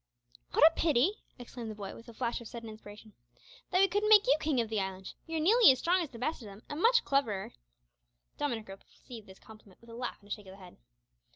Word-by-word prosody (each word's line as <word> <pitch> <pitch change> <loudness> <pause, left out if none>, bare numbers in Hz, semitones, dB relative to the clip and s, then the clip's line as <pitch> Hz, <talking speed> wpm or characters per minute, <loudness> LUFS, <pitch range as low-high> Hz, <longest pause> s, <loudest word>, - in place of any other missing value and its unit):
"What - - +6
a 325 - +2
pity," 315 +3 +2 0.2
exclaimed 240 -1 -8
the 215 - -7
boy, 200 -2 -7
with 230 +1 -13
a - - -11
flush 240 0 -3
of 235 - -9
sudden 230 -1 -9
inspiration, 215 0 -13 0.6
"that - - +1
we 390 - +6
couldn't 410 +3 0
make 420 -2 +7
you 275 - +4
king 300 -5 0
of 230 - 0
the 220 -1 -2
island! 190 -1 -5
You're 325 0 -3
nearly 430 - +6
as 260 - 0
strong 360 +6 +1
as 325 - -4
the 235 - -12
best 275 +5 -3
of 220 - -10
them, 200 +2 -13
and 295 +3 -5
much 480 +3 +4
cleverer." 230 -9 -1 0.8
Dominick 235 -7 -3
received 210 +3 -13
this 190 0 -14
compliment 215 -4 -17
with 235 0 -16
a - - -10
laugh 245 0 -5
and 205 - -21
a - - -15
shake 210 -3 -10
of 190 - -11
the - - -14
head. 185 -2 -14
235 Hz, 245 wpm, -31 LUFS, 210-310 Hz, 0.8 s, make